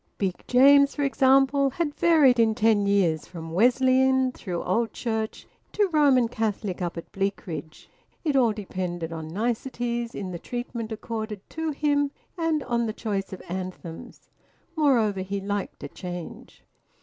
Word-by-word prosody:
Big 190 -3 -2
James, 280 +2 +6
for 290 - -1
example, 275 0 +4
had 295 +2 -2
varied 295 -8 +4
in 220 -1 +4
ten 215 -2 +3
years 175 -6 +2
from 165 -2 -8
Wesleyan, 260 +5 +3
through 180 -8 -5
Old 225 +5 0
Church, 220 -2 -3 0.3
to 415 -1 +2
Roman 280 -7 +4
Catholic 210 -5 -3
up 175 -1 -3
at 170 - -8
Bleakridge. 170 -6 -4 0.4
It 300 -4 0
all 245 -4 +4
depended 180 -5 -4
on 160 -1 -6
niceties 235 +4 -2
in 190 -2 -5
the 170 - -6
treatment 240 -1 -5
accorded 220 -2 -5
to 320 0 -3
him, 290 -1 +1 0.3
and 325 -4 0
on 235 -2 0
the 215 - -3
choice 200 -4 -3
of 190 - -8
anthems. 180 -2 -7 0.5
Moreover, 240 - +2
he 195 +1 -3
liked 200 0 -4
a - - -4
change. 175 -2 -8
225 Hz, 150 wpm, -26 LUFS, 190-265 Hz, 0.5 s, James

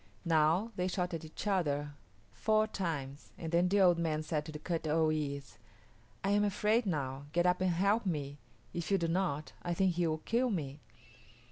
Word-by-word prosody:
Now, 165 +6 +3
they 180 0 0
shot 180 -1 -2
at 165 - -4
each 155 +6 -8
other 145 -7 0 0.4
four 215 0 +2
times, 155 -9 -4
and 165 -1 -5
then 175 +1 +3
the 200 +1 +3
old 175 -2 +5
man 155 -2 0
said 155 -1 -2
to 155 -1 -6
Kut 165 +1 -3
o 160 +1 +3
yis´, 140 -3 -3 0.7
"I 195 - +1
am 205 0 +4
afraid 210 +3 +2
now; 140 -4 -2
get 175 +1 +2
up 180 0 +3
and 185 - +3
help 200 +5 +2
me. 145 -4 -3 0.3
If 170 -1 -3
you 195 - +4
do 170 -2 0
not, 165 -4 -1
I 175 -1 -2
think 190 +1 +3
he 175 0 +1
will 155 0 0
kill 245 +2 +2
me." 150 - -3
170 Hz, 195 wpm, -33 LUFS, 155-190 Hz, 0.7 s, old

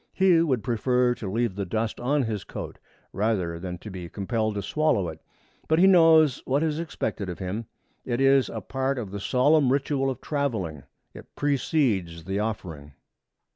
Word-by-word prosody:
He 185 -3 +4
would 130 -10 0
prefer 125 +1 +1
to 105 -5 -6
leave 115 -1 0
the 100 +1 -3
dust 110 +4 -2
on 140 +3 +1
his 110 -4 -3
coat - - -8 0.3
rather 95 -6 -1
than 90 0 -5
to 105 +4 -10
be 90 -2 -7
compelled 110 +2 -2
to 100 - -3
swallow 125 - +1
it. 80 0 -9 0.5
But 160 - +3
he 180 - +6
knows 165 -6 +6
what 140 +4 +1
is 155 -1 -1
expected 105 - -3
of 90 - -5
him. 100 +4 -4 0.4
It 120 -1 -2
is 135 -3 +4
a 110 - -5
part 135 +5 -2
of 105 -6 -5
the 100 - -5
solemn 135 +5 +3
ritual 135 0 0
of 130 -2 -4
traveling. 110 - -3 0.3
It - - -14
precedes 120 - 0
the 95 +4 -2
offering. 85 -10 -5
115 Hz, 175 wpm, -26 LUFS, 95-140 Hz, 0.5 s, he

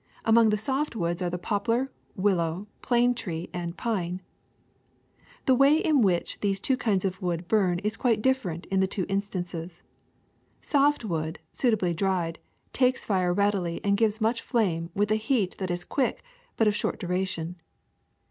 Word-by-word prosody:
Among 225 0 +6
the 210 - +2
soft 265 +5 -1
woods 175 -2 -1
are 180 - 0
the 180 - -3
poplar, 230 +8 0 0.2
willow, 185 -2 0 0.2
plane 245 0 +3
tree, 170 -8 -5
and 175 0 -4
pine. 185 -5 -2 1.2
^'The 260 - +5
way 275 +4 +5
in 310 -4 +3
which 180 -5 +1
these 195 -1 0
two 265 - +2
kinds 205 -6 0
of 190 0 -2
wood 175 -1 -2
burn 190 -5 +2
is 215 +2 -1
quite 235 -4 +2
different 205 -11 0
in 195 - +2
the 190 - +3
two 190 -1 -2
instances. 180 -4 -4 0.8
Soft 285 -3 +2
wood, 160 -4 -2 0.2
suitably 215 -8 +1
dried, 175 -2 -1 0.3
takes 255 0 +2
fire 185 -3 +1
readily 190 -3 +1
and 200 0 +3
gives 220 0 +1
much 230 +1 +1
flame 175 -9 0
with 205 +1 +1
a 215 - +4
heat 220 -6 +1
that 190 -2 -2
is 175 0 -2
quick 265 +5 -1 0.3
but 225 - +3
of 210 - +4
short - - -2
duration. 180 -2 -3
195 Hz, 165 wpm, -27 LUFS, 175-230 Hz, 1.2 s, Among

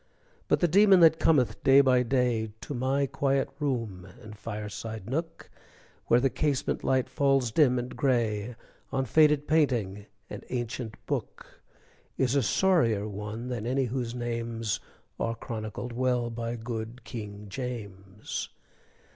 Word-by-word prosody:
But - - +2
the 175 - +4
demon 195 +2 +6
that 160 -1 +6
cometh 140 -7 +2
day 135 +1 +7
by 130 -2 +5
day 125 -3 +1
To - - -6
my 135 +2 +1
quiet 135 0 0
room 115 - -2 0.2
and 105 0 -10
fireside 110 -1 -6
nook, 165 +6 -4 0.6
Where 120 - +5
the 135 +1 +1
casement 145 -4 -1
light 130 -1 +2
falls 135 -4 +2
dim 130 -2 +4
and 125 +1 -4
gray 120 -4 0 0.4
On 135 -1 0
faded 150 +2 +4
painting 115 -10 +1 0.2
and - - -8
ancient 120 -2 -4
book, - - -5 0.6
Is 130 -1 +1
a 140 - +4
sorrier 115 - +2
one 105 +3 -6
than 120 -3 -3
any 130 +1 +1
whose 120 -1 -3
names 115 -2 -2 0.4
Are 115 0 -1
chronicled 115 0 -6
well 125 -1 0
by 115 0 -3
good 115 +1 -6
King 105 -3 -7
James. 100 -5 -6
120 Hz, 140 wpm, -28 LUFS, 110-135 Hz, 0.6 s, day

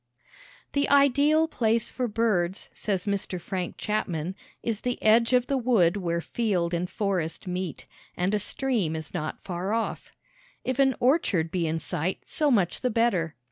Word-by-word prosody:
The 280 0 +1
ideal 285 +3 +4
place 230 -6 0
for 250 -1 -2
birds, 210 -5 0
says 195 -2 -2
Mr. 200 -2 -2
Frank 180 +1 -4
Chapman, 180 -5 -2 0.3
is 225 -3 -2
the 245 0 -2
edge 230 +2 +5
of 250 -1 +4
the 275 +1 0
wood 215 -8 +3
where 170 -4 -1
field 180 -3 -1
and 175 +1 -1
forest 190 -6 -2
meet, 180 -2 -4 0.3
and 180 +3 0
a 210 - +2
stream 210 - 0
is 160 -1 -6
not 155 - -4
far 185 +2 -3
off. 230 0 -2 0.5
If 260 0 -2
an 270 -2 +4
orchard 225 - +2
be 170 -2 0
in 160 +1 -1
sight, 165 +3 -2
so 300 -1 +1
much 195 -9 +2
the 250 - +1
better. 200 -9 +1
205 Hz, 165 wpm, -27 LUFS, 175-240 Hz, 0.5 s, edge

